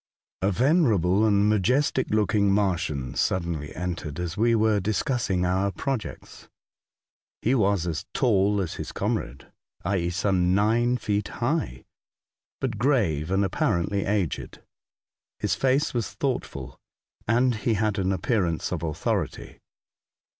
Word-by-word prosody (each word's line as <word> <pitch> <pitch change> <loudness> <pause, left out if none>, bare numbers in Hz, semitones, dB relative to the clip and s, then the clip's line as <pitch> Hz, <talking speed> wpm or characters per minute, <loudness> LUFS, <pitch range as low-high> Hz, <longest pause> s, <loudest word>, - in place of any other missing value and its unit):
A 95 - +2
venerable 110 - +3
and 100 -1 +3
majestic 125 +6 +2
looking 105 -1 +2
Martian 85 -10 0
suddenly 85 -5 -1
entered 90 -3 -4
as 90 0 -3
we 115 +2 +3
were 110 -1 +3
discussing 100 -1 0
our 95 +2 +1
projects. 135 -1 -5 0.9
He 120 - +2
was 100 -7 +2
as 85 +2 -3
tall 105 -5 +2
as 85 - -3
his - - -6
comrade, 65 +2 -3 0.3
i.e., 85 -2 0
some 90 0 +1
nine 115 +4 +2
feet 105 -3 -1
high, 120 - -2 0.7
but 120 -6 -3
grave 100 - +1
and 95 +1 +2
apparently 95 0 0
aged. 100 -6 -2 0.7
His - - 0
face 135 +2 +1
was 120 -3 -2
thoughtful, - - -4 0.5
and 120 +3 +3
he 110 +1 0
had 105 -1 0
an 95 0 +1
appearance 95 - 0
of - - -2
authority. 80 -3 -3
100 Hz, 125 wpm, -25 LUFS, 90-115 Hz, 0.9 s, venerable